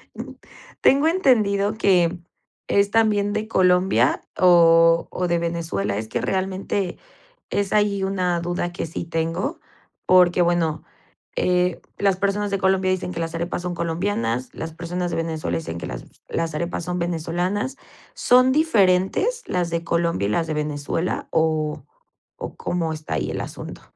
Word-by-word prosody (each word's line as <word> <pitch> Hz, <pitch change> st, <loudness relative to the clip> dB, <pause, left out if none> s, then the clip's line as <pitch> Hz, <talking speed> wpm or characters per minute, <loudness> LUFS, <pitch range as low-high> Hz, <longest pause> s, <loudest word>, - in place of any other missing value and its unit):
Mm, -, -, -7 dB, 0.5 s
tengo 280 Hz, +4 st, +4 dB
entendido 215 Hz, -, +2 dB
que 180 Hz, -5 st, +2 dB, 0.5 s
es 200 Hz, 0 st, +3 dB
también 210 Hz, -2 st, +2 dB
de 215 Hz, +1 st, -2 dB
Colombia 185 Hz, -2 st, +3 dB, 0.2 s
o 165 Hz, -2 st, +5 dB
o 180 Hz, -1 st, -2 dB
de 170 Hz, 0 st, +1 dB
Venezuela. 165 Hz, -13 st, -2 dB
Es 110 Hz, +1 st, -4 dB
que 120 Hz, -, -2 dB
realmente 190 Hz, -, -2 dB, 0.5 s
es 200 Hz, -1 st, -1 dB
ahí 205 Hz, -2 st, +2 dB
una 180 Hz, -3 st, 0 dB
duda 175 Hz, 0 st, -2 dB
que 175 Hz, -, -4 dB
sí 165 Hz, +1 st, -5 dB
tengo, 165 Hz, -, -2 dB, 0.5 s
porque, 180 Hz, -1 st, +5 dB
bueno, 165 Hz, -3 st, 0 dB, 0.5 s
eh, 180 Hz, -1 st, +1 dB, 0.2 s
las 195 Hz, -2 st, +2 dB
personas 200 Hz, +1 st, 0 dB
de 200 Hz, -, 0 dB
Colombia 190 Hz, 0 st, +2 dB
dicen 185 Hz, -1 st, -2 dB
que 165 Hz, -, -5 dB
las 165 Hz, 0 st, -3 dB
arepas 170 Hz, +1 st, -3 dB
son 180 Hz, -1 st, -3 dB
colombianas, 165 Hz, -, -2 dB
las 160 Hz, 0 st, -6 dB
personas 175 Hz, +1 st, -3 dB
de 165 Hz, -, -2 dB
Venezuela 160 Hz, -, -2 dB
dicen 80 Hz, +1 st, -6 dB
que -, -, -6 dB
las -, -, -6 dB, 0.2 s
las 165 Hz, -2 st, -2 dB
arepas 170 Hz, +1 st, -3 dB
son 180 Hz, 0 st, -3 dB
venezolanas. 175 Hz, -, -2 dB, 0.4 s
¿Son 255 Hz, +1 st, +4 dB
diferentes 265 Hz, -, +2 dB
las 175 Hz, -2 st, -1 dB
de 170 Hz, 0 st, -2 dB
Colombia 170 Hz, -, 0 dB
y -, -, -1 dB
las 165 Hz, +9 st, 0 dB
de 155 Hz, -, -3 dB
Venezuela, 150 Hz, +3 st, -2 dB
o 155 Hz, -3 st, 0 dB, 0.5 s
o -, -, -7 dB
cómo 165 Hz, -2 st, -2 dB
está 155 Hz, -1 st, -5 dB
ahí -, -, -1 dB
el -, -, -3 dB
asunto? -, -, -8 dB
175 Hz, 155 wpm, -22 LUFS, 165-195 Hz, 0.5 s, o